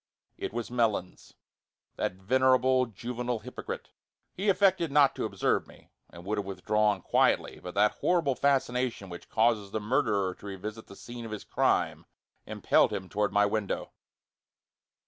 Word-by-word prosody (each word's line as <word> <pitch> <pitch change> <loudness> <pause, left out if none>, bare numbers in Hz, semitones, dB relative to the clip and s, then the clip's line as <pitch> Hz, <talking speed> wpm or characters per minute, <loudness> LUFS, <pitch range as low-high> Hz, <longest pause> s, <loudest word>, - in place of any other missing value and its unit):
It - - -5
was 120 +1 -4
Melons, 110 -7 -1 0.6
that - - -1
venerable, 130 +5 +3
juvenile 120 +3 -4
hypocrite. 110 - -7 0.4
He 200 +3 -1
affected 190 -5 +3
not 140 -1 +5
to - - -3
observe 100 -3 0
me, - - -18 0.2
and 85 0 -12
would 105 +1 -1
have 100 - -3
withdrawn 105 +1 0
quietly, - - +2
but 90 +1 -8
that 105 +1 +2
horrible 170 -6 +2
fascination 125 -6 0
which 85 - -10
causes 110 -3 +2
the 110 - -2
murderer 105 -4 +1
to - - -16
revisit 105 +3 -7
the 100 - -12
scene 120 +2 -9
of 115 - -7
his 110 -1 -6
crime - - 0 0.4
impelled - - +2
him 95 -1 -4
toward 105 -1 0
my 105 +1 +4
window. 100 -1 -2
110 Hz, 150 wpm, -29 LUFS, 100-130 Hz, 0.6 s, not